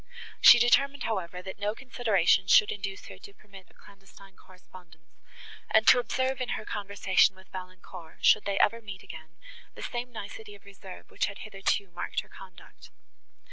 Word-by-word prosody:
She - - +9
determined, 275 +3 +2
however, 180 -4 -4
that 190 +1 -9
no 210 +1 -2
consideration 220 -9 +1
should 205 +2 +5
induce 195 -1 -6
her - - -12
to 405 -1 -14
permit 195 -2 -16
a - - -26
clandestine 195 0 -18
correspondence, 180 -3 -19 0.5
and 220 0 +3
to 250 - +7
observe 260 +1 -2
in 250 - -2
her 215 - -9
conversation 200 -1 +1
with 190 0 -19
Valancourt, 185 -2 -10
should 215 - +5
they 200 -1 -2
ever 230 +3 +2
meet 195 -4 -10
again, 160 +2 -12 0.4
the - - -9
same 245 +1 -5
nicety 210 -1 -9
of 200 - -20
reserve, 195 -2 -13
which - - -1
had 200 +1 -9
hitherto 195 -2 -2
marked 175 - -4
her - - -22
conduct. 185 -2 -15
200 Hz, 170 wpm, -27 LUFS, 185-220 Hz, 0.5 s, She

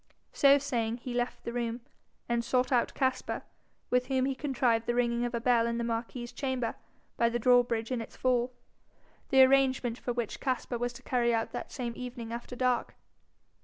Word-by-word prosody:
So 280 0 +6
saying, 235 -5 -1
he 250 0 -6
left 245 0 -2
the 235 - -4
room, 240 0 -2 0.5
and 235 0 0
sought 250 +3 +1
out 245 -2 +2
Caspar, 260 -2 -1 0.5
with 250 0 +2
whom 260 -1 +1
he 270 - 0
contrived 250 -5 0
the 240 - +1
ringing 240 0 +1
of 240 0 -3
a - - 0
bell 235 -1 +3
in 235 0 -1
the 235 - -1
marquis's 235 +1 -3
chamber 255 -3 -2 0.4
by 235 - +3
the 235 - -1
drawbridge 240 -1 +3
in 250 -2 -1
its - - -9
fall, 250 -1 +1 0.8
the 265 -2 +7
arrangement 260 -3 +3
for 245 - -3
which 235 -3 -3
Caspar 255 -2 -2
was 245 0 -1
to 260 +2 -12
carry 240 -2 +2
out 225 - -1
that - - -6
same 245 -4 -4
evening 245 -2 -6
after 240 +1 -6
dark. 250 -1 0
245 Hz, 190 wpm, -30 LUFS, 235-255 Hz, 0.8 s, the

